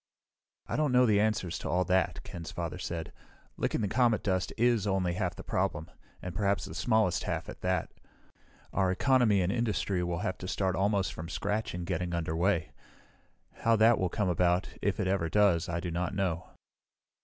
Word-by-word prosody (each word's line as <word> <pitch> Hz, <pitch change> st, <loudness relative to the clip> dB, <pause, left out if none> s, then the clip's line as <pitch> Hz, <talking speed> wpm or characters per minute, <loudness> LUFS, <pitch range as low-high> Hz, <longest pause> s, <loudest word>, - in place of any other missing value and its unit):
"I -, -, -3 dB
don't 150 Hz, -3 st, +2 dB
know 125 Hz, 0 st, +5 dB
the 105 Hz, -3 st, +4 dB
answers 105 Hz, -5 st, 0 dB
to -, -, -5 dB
all 90 Hz, +1 st, +1 dB
that," 95 Hz, +2 st, +1 dB
Ken's 85 Hz, -2 st, -7 dB
father 85 Hz, 0 st, -4 dB
said. 85 Hz, -2 st, -5 dB, 0.4 s
"Licking -, -, -1 dB
the 105 Hz, -, 0 dB
comet 115 Hz, 0 st, +2 dB
dust 95 Hz, -3 st, 0 dB
is 115 Hz, -3 st, +2 dB
only 95 Hz, -3 st, +1 dB
half 90 Hz, -, -2 dB
the -, -, -9 dB
problem 80 Hz, +4 st, -2 dB, 0.3 s
and 90 Hz, -, -5 dB
perhaps 100 Hz, 0 st, 0 dB
the -, -, -8 dB
smallest 105 Hz, -5 st, +1 dB
half, -, -, -2 dB
at -, -, -9 dB
that. -, -, -1 dB, 0.8 s
Our 95 Hz, -2 st, +2 dB
economy 110 Hz, 0 st, +3 dB
and 90 Hz, -, 0 dB
industry 105 Hz, -5 st, 0 dB
will 85 Hz, -1 st, -2 dB
have 95 Hz, -, -2 dB
to 90 Hz, -, -6 dB
start 95 Hz, -1 st, 0 dB
almost 100 Hz, 0 st, +1 dB
from 80 Hz, +1 st, -7 dB
scratch 105 Hz, +1 st, -2 dB
in 90 Hz, -, -4 dB
getting 90 Hz, 0 st, -2 dB
underway. 85 Hz, +1 st, 0 dB, 0.9 s
How 115 Hz, 0 st, +3 dB
that 115 Hz, +1 st, +5 dB
will 90 Hz, -, +1 dB
come 105 Hz, +3 st, -1 dB
about, 90 Hz, +1 st, +2 dB
if 100 Hz, 0 st, 0 dB
it 105 Hz, -, +1 dB
ever 95 Hz, -3 st, 0 dB
does, 90 Hz, -3 st, +3 dB
I 85 Hz, 0 st, -1 dB
do 85 Hz, 0 st, -4 dB
not 90 Hz, +3 st, -2 dB
know." 90 Hz, -4 st, -1 dB
95 Hz, 190 wpm, -30 LUFS, 85-105 Hz, 0.9 s, know